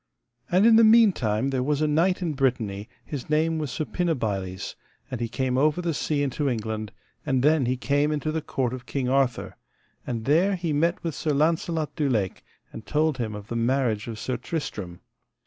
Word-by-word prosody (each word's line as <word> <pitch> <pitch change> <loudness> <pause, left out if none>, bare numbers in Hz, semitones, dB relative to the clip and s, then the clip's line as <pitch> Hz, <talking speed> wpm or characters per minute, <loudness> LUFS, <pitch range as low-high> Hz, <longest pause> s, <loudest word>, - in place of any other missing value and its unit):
And 185 +4 +4
in 230 -1 +7
the 230 - +7
meantime 175 - +4
there 130 -1 0
was 145 +2 0
a 155 - +2
knight 175 +5 +2
in 165 -3 -1
Brittany, 115 -6 -1 0.2
his 140 -4 -6
name 160 +1 +1
was 150 -3 -3
Suppinabiles, 110 - -2 0.4
and 125 -2 -4
he 120 - 0
came 130 +1 0
over 150 +3 +2
the 170 -2 -1
sea 145 0 -1
into 140 +1 -1
England, 110 -3 -3 0.3
and 130 -3 0
then 150 -3 +3
he 130 +1 0
came 145 +3 +1
into 155 0 -1
the 160 0 -2
court 130 -4 -2
of 125 -1 -8
King 130 -3 -2
Arthur, 135 -2 0 0.5
and 115 -3 -3
there 175 +8 +3
he 170 -4 -2
met 165 +4 +1
with 165 -2 -2
Sir 150 +1 -1
Launcelot 160 +1 0
du 150 -4 0
Lake, 105 -7 -1 0.3
and 110 - -9
told 150 -2 +1
him 110 -3 -2
of 105 0 -9
the 120 - -3
marriage 115 -2 0
of 115 -2 -5
Sir 125 +3 -3
Tristram. 105 - -5
140 Hz, 195 wpm, -25 LUFS, 120-155 Hz, 0.5 s, in